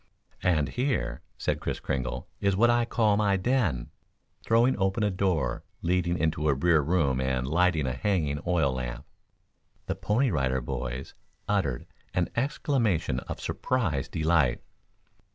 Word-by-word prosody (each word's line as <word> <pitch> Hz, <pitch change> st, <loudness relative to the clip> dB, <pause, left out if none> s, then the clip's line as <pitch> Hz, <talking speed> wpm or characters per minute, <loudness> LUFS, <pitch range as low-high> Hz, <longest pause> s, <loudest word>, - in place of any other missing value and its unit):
"And 80 Hz, -6 st, +2 dB
here," 65 Hz, -, -1 dB, 0.2 s
said -, -, -1 dB
Kris -, -, -3 dB
Kringle, 65 Hz, -1 st, -3 dB
"is 100 Hz, -1 st, +2 dB
what 120 Hz, +4 st, +5 dB
I 120 Hz, 0 st, +2 dB
call 110 Hz, -3 st, +2 dB
my 100 Hz, -2 st, +2 dB
den," 95 Hz, -, 0 dB, 0.5 s
throwing 115 Hz, +3 st, +3 dB
open 95 Hz, +3 st, +1 dB
a 105 Hz, -, +2 dB
door 90 Hz, -8 st, 0 dB, 0.2 s
leading 90 Hz, 0 st, +1 dB
into 75 Hz, 0 st, 0 dB
a 70 Hz, -, +3 dB
rear 80 Hz, +2 st, +3 dB
room 70 Hz, -5 st, +1 dB
and 65 Hz, -1 st, 0 dB
lighting 85 Hz, -1 st, +2 dB
a 65 Hz, -, -1 dB
hanging 80 Hz, -, 0 dB
oil 80 Hz, -7 st, +2 dB
lamp. 65 Hz, +1 st, -5 dB, 0.8 s
The -, -, -1 dB
Pony 120 Hz, +4 st, +1 dB
Rider 65 Hz, -5 st, +1 dB
Boys 60 Hz, +1 st, -5 dB, 0.3 s
uttered 95 Hz, -12 st, 0 dB, 0.3 s
an 90 Hz, -1 st, +1 dB
exclamation 115 Hz, -, 0 dB
of -, -, -5 dB
surprised 90 Hz, -, -1 dB
delight. 80 Hz, -5 st, +2 dB
85 Hz, 140 wpm, -28 LUFS, 65-105 Hz, 0.8 s, what